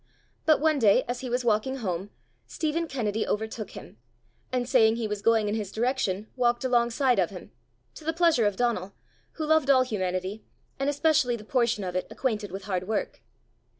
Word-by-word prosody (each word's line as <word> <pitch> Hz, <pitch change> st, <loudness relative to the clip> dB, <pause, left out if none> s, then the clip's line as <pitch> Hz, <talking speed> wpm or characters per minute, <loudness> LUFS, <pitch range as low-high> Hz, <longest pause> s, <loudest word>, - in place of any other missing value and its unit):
But 310 Hz, -, +5 dB
one 310 Hz, -1 st, +2 dB
day 225 Hz, +2 st, +5 dB
as 245 Hz, +1 st, -3 dB
he 255 Hz, -, -5 dB
was 245 Hz, +1 st, -1 dB
walking 225 Hz, +4 st, +1 dB
home, 195 Hz, -6 st, -3 dB, 0.4 s
Stephen 325 Hz, +2 st, -2 dB
Kennedy 220 Hz, -6 st, -2 dB
overtook 220 Hz, 0 st, -3 dB
him, -, -, -11 dB, 0.5 s
and 250 Hz, -1 st, -1 dB
saying 225 Hz, -4 st, +4 dB
he 230 Hz, -2 st, -2 dB
was 210 Hz, -1 st, -4 dB
going 220 Hz, -1 st, +3 dB
in 205 Hz, -, -1 dB
his 210 Hz, -3 st, -3 dB
direction, 220 Hz, -4 st, -1 dB
walked 240 Hz, 0 st, +1 dB
alongside 245 Hz, +1 st, +2 dB
of -, -, +2 dB
him -, -, -10 dB, 0.4 s
to -, -, -12 dB
the 320 Hz, -, 0 dB
pleasure 325 Hz, -9 st, +3 dB
of 205 Hz, -, -1 dB
Donal, 220 Hz, -5 st, -1 dB, 0.4 s
who 315 Hz, -, -4 dB
loved 310 Hz, -2 st, +3 dB
all 260 Hz, -2 st, +6 dB
humanity, 190 Hz, -3 st, -3 dB, 0.4 s
and 275 Hz, +1 st, +1 dB
especially 290 Hz, -4 st, +2 dB
the 220 Hz, -, -9 dB
portion 235 Hz, -3 st, +1 dB
of 180 Hz, -1 st, -4 dB
it 185 Hz, -, -1 dB
acquainted 215 Hz, -6 st, -2 dB
with 195 Hz, +1 st, -6 dB
hard 185 Hz, -2 st, -3 dB
work. 220 Hz, -1 st, -2 dB
235 Hz, 185 wpm, -27 LUFS, 210-265 Hz, 0.5 s, all